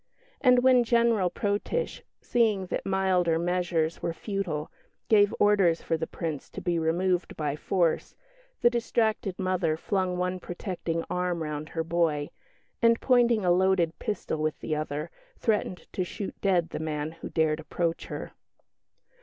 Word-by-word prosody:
And 250 -2 +6
when 255 -1 +6
General 230 -5 +3
Protitsch, 205 - -2 0.2
seeing 215 -5 +2
that - - -2
milder 185 -3 +2
measures 170 -2 0
were 170 - -1
futile, 180 -8 -3 0.4
gave 205 -2 +5
orders 195 -5 +4
for 165 - 0
the 160 0 -3
Prince 160 -5 -5
to - - -7
be 175 -2 0
removed 175 +3 0
by 150 -2 -1
force, 170 +1 0 0.5
the 240 - +6
distracted 225 -4 0
mother 185 -4 0
flung 185 +1 -1
one 180 +1 -1
protecting 175 -2 -4
arm 180 -2 -1
round 150 0 -4
her 165 - -2
boy; 160 -3 0 0.5
and, 230 0 +5
pointing 240 -5 +3
a 175 - +4
loaded 180 -2 +2
pistol 205 -6 -3
with 155 0 -1
the 155 - -2
other, 150 +1 -3 0.3
threatened 210 -5 -1
to 185 - 0
shoot 195 +2 -5
dead 180 -4 +2
the - - -5
man 155 -1 -3
who 165 - -9
dared 155 -1 +1
approach 165 +1 -2
her. - - -6
180 Hz, 150 wpm, -28 LUFS, 160-205 Hz, 0.5 s, And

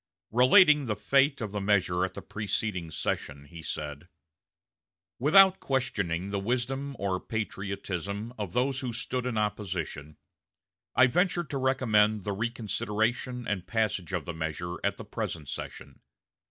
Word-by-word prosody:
Relating 145 - +6
the 105 - 0
fate 135 +6 +2
of 105 -3 -3
the 105 -1 -3
measure 95 -3 +2
at 95 0 -2
the - - -7
preceding 105 -4 -2
session, 70 -1 -3
he 85 +3 -11
said: 75 0 -5 1.1
"Without 190 +8 +7
questioning 100 -9 -1
the 100 - -1
wisdom 130 +6 -2
or 95 -2 -1
patriotism 100 0 -4
of 100 -6 -5
those 130 +1 +1
who 130 -3 -3
stood 125 +2 -2
in 120 -3 -2
opposition, 90 -8 -3 0.8
I 130 - +7
venture 175 +6 +2
to 145 -3 -4
recommend 110 -6 +3
the 100 - -2
reconsideration 115 +2 -1
and 95 -3 -2
passage 105 -5 0
of 90 -6 -2
the 85 - -4
measure 80 +2 -4
at - - 0
the - - -8
present 80 -4 -4
session. 70 0 -7
105 Hz, 140 wpm, -29 LUFS, 90-125 Hz, 1.1 s, Without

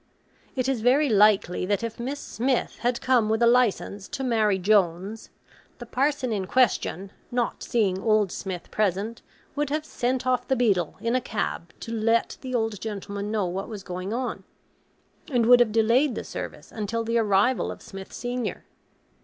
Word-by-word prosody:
It 255 -1 0
is 265 -4 0
very 270 +5 +4
likely 205 -4 +4
that 205 +3 0
if 230 0 -5
Miss 270 +4 -3
Smith 250 +2 -1
had 245 0 0
come 245 -4 +3
with 220 0 +2
a - - +7
licence 235 -4 +2
to 280 -2 -5
marry 220 -5 +2
Jones, 195 +1 +1 0.5
the 240 - -8
parson 265 0 0
in 195 -3 -2
question, 200 -6 +1 0.2
not 240 -1 -1
seeing 195 -5 0
old 215 -4 +2
Smith 185 -3 -6
present, 210 +2 -1 0.3
would 295 -1 -1
have 305 +1 -1
sent 255 -2 -1
off 250 -1 +1
the 265 - +2
beadle 200 -9 +1
in 230 +2 0
a 255 - +2
cab 75 - -3
to 230 - -6
let 230 +1 +1
the 255 -1 -4
old 225 -4 -1
gentleman 200 -1 -4
know 210 -3 0
what 185 +4 -4
was 210 -3 -7
going 185 +2 -5
on; 245 +2 -3 0.9
and 240 -3 +3
would 245 +1 +7
have 240 -3 +4
delayed 230 +5 +3
the - - -4
service - - -7
until 225 +1 -2
the 230 +1 +1
arrival 210 +3 +2
of - - -10
Smith 195 -1 -9
senior. 245 0 -4
225 Hz, 175 wpm, -25 LUFS, 200-245 Hz, 0.9 s, a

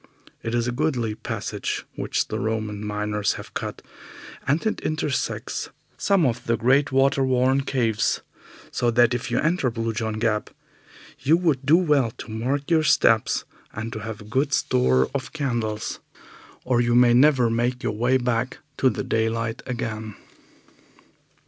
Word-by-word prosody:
It 115 +1 -2
is 120 0 0
a - - 0
goodly 120 -5 0
passage - - -4
which - - -2
the - - -2
Roman 110 -2 -2
miners 105 -1 -1
have - - -10
cut, - - -5 0.6
and 145 +7 +1
it 220 - 0
intersects 150 -3 -2 0.3
some 195 -5 +2
of 125 -1 -1
the 115 0 +2
great 135 +6 +3
water 135 +1 +3
worn 130 +1 +2
caves, 115 -5 0 0.5
so 120 - +1
that 120 +1 +4
if 125 0 -3
you - - 0
enter 165 -4 +1
Blue 115 -1 -2
John 110 -1 -2
Gap 110 -1 0 0.7
you 140 +5 +4
would 150 -6 0
do 160 +4 +7
well 150 -9 +3
to - - -8
mark 135 +7 -2
your 160 -1 +5
steps 115 -7 +3 0.3
and 110 +2 -5
to 110 - -5
have 105 0 -6
a - - -11
good 135 +6 0
store 65 - +2
of 135 -2 -4
candles, 120 -7 -2 0.7
or 125 -1 +2
you 120 0 +2
may 120 -1 +6
never 125 -2 +5
make 120 +3 0
your 110 - -1
way 120 +5 +2
back 125 0 -1 0.2
to 130 - +4
the 110 - -3
daylight 115 +1 -1
again. 110 -4 -4
120 Hz, 160 wpm, -24 LUFS, 110-135 Hz, 0.7 s, do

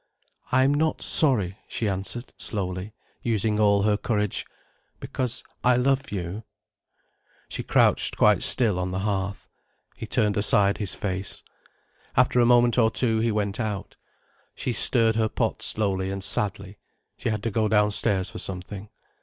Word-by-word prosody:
"I'm 130 +2 +4
not 155 +2 0
sorry," 105 - +2
she 110 - -2
answered 100 +5 -3
slowly, 95 0 -4 0.3
using 110 -2 0
all 100 -1 +4
her 105 0 +2
courage. 105 -2 -1 0.5
"Because 130 -1 -2 0.2
I 125 0 +4
love 135 +2 +1
you—" 95 +2 -4 1.1
She - - -4
crouched - - +2
quite - - +4
still 110 -8 +2
on 90 0 -2
the 95 +1 -3
hearth. 100 -1 -3 0.5
He - - -7
turned 105 0 +1
aside 100 0 +3
his 100 -4 -3
face. 95 -1 -4 0.7
After 125 0 +4
a 120 - +5
moment 120 0 +4
or 110 -2 +5
two 115 0 0
he 115 +1 +1
went 100 -1 -2
out. 105 -4 -4 0.6
She 125 - -3
stirred 115 0 +3
her 110 -1 +1
pot - - -2
slowly 95 -3 -1
and 95 0 -4
sadly. 100 0 -1 0.4
She - - -2
had 105 -2 -2
to 115 - -1
go 110 +1 +1
downstairs 105 -2 +2
for 110 - -7
something. 95 +2 -6
105 Hz, 150 wpm, -25 LUFS, 100-115 Hz, 1.1 s, a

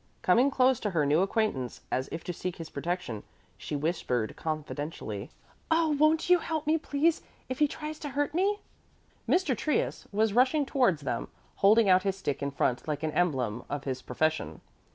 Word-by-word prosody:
Coming 240 +9 +5
close 260 -2 +3
to 210 - -1
her 165 -6 +1
new 150 +4 +3
acquaintance, 195 - -1
as 130 +1 -1
if 165 - -5
to 180 - -4
seek 180 +1 -4
his 165 -1 -8
protection, 145 - -3 0.3
she - - -5
whispered 140 -7 -1
confidentially. 150 -8 -4 0.4
"Oh, 325 0 +3
won't 310 +3 +3
you 360 0 +6
help 320 -2 -3
me, 315 +2 +2
please, 310 +2 +1 0.3
if 255 - -4
he 300 - +5
tries 305 +1 -6
to 290 - -5
hurt 290 +1 -1
me?" 400 +4 +1 0.7
Mr. 345 -8 +3
Trius 300 +5 -1
was 215 0 +2
rushing 260 +5 +3
towards 245 - +2
them, 120 -3 -2 0.3
holding 215 +2 +5
out 185 -1 +6
his 195 0 -1
stick 145 -8 -3
in 140 - -1
front 130 -1 -1
like 150 0 -2
an 155 - 0
emblem 130 -10 0
of 145 -1 -3
his 130 -1 -3
profession. 125 - -1
185 Hz, 180 wpm, -29 LUFS, -, 0.7 s, you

